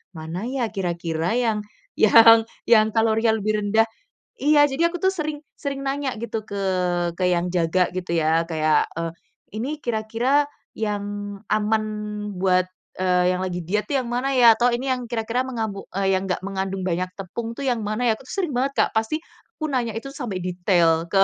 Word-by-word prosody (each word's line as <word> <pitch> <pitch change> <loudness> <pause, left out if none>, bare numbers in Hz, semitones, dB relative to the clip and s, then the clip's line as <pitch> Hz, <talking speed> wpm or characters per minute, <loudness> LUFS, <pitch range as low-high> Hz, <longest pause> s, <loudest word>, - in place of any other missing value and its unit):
mana 165 +7 -5
ya 250 -3 -2
kira-kira 170 -1 -2
yang 225 -4 +1 0.4
yang 225 0 +7 0.2
yang 220 -2 +5
kalorinya 225 0 +3
lebih 215 0 0
rendah. 215 +2 +3 0.6
Iya, 295 0 +6
jadi 320 +5 +1
aku 350 - -5
tuh 380 +2 +1
sering 310 -4 -3 0.2
sering 275 -1 -5
nanya 275 0 -1
gitu 225 -1 -3
ke 200 - -4 0.6
ke 185 - -1
yang 175 0 +1
jaga 175 +1 +1
gitu 180 -1 -4
ya, 160 +1 +3
kayak, 155 -1 +2
eee, 165 0 -2 0.4
"Ini 240 +6 -2 0.2
kira-kira 240 +6 +1 0.2
yang 210 -2 -2 0.5
aman 215 +1 +1 0.6
buat, 185 -1 +3 0.3
eee, 180 -1 +2
yang 185 0 0
lagi 180 -1 -3
diet 200 +6 -1
tuh 285 - -2
yang 240 - -7
mana 255 +3 -1
ya?" 235 -3 +7
Atau, 245 0 +3
"Ini 250 +3 -2
yang 255 -1 0
kira-kira 230 +2 -2
yang 260 - -6
mengambu 220 -4 -3
eee, 195 0 0
yang 190 - -4
enggak 180 -2 -2
mengandung 195 0 -3
banyak 180 0 -1
tepung 225 +5 -6
tuh 255 - -8
yang 240 -2 0
mana 225 +3 0
ya?" 220 - +2
Aku 265 - -16
sering 360 +4 -2
banget, 275 +2 0
Kak. - - +2
Pasti 225 +9 -1 0.3
aku 310 -6 -4
nanya 240 -5 -1
itu 235 +5 -6
sampai 235 -10 -5
detail 175 -2 +2
ke 195 0 +6
220 Hz, 185 wpm, -23 LUFS, 185-250 Hz, 0.6 s, yang